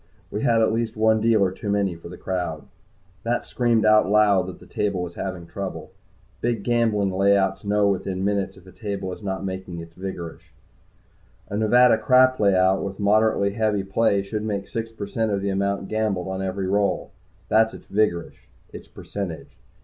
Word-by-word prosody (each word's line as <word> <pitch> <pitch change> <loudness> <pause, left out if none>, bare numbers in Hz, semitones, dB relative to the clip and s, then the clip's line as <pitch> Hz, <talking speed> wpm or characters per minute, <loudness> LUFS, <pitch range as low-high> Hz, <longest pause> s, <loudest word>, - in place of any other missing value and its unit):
We 105 - -3
had 115 -4 +3
at 110 - +2
least 115 -1 -2
one 110 0 +3
dealer 110 -4 +3
too 100 +2 -6
many 100 -2 +1
for 85 0 -11
the 90 - -9
crowd. 90 -5 -3 0.6
That 120 +1 -1
screamed 120 -3 +1
out 110 -2 +5
loud 100 -3 +3
the - - -16
table 100 -3 -2
was 85 -1 -6
having 95 -2 -5
trouble. 95 +2 -6 0.5
Big 115 -3 -1
gambling 110 -4 +1
layouts 95 0 +2
know 105 0 +2
within 95 -1 -1
minutes 100 -1 -1
if 90 - -17
a 95 - -13
table 100 -4 -4
is - - -10
not 95 -1 -3
making 95 -2 -5
its 85 0 -10
vigorish. 90 -3 -7 1.0
A 100 - -4
Nevada 115 +2 +5
crap 130 +1 +4
layout, 95 -1 +3
with 100 0 -5
moderately 105 0 +3
heavy 105 -1 0
play, 100 0 +1
should 105 +2 -4
make 100 -2 -3
six 115 0 -4
per 110 -2 -6
cent 110 +2 -1
of 100 -1 0
the 100 - 0
amount 100 0 -1
gambled 105 -4 -1
on 95 0 -3
every 95 0 -2
roll. 100 +1 0 0.4
That's 110 +1 +3
its - - -13
vigorish 100 -5 -1 0.3
its - - -10
percentage. 95 -6 -6
100 Hz, 180 wpm, -24 LUFS, 95-110 Hz, 1.0 s, out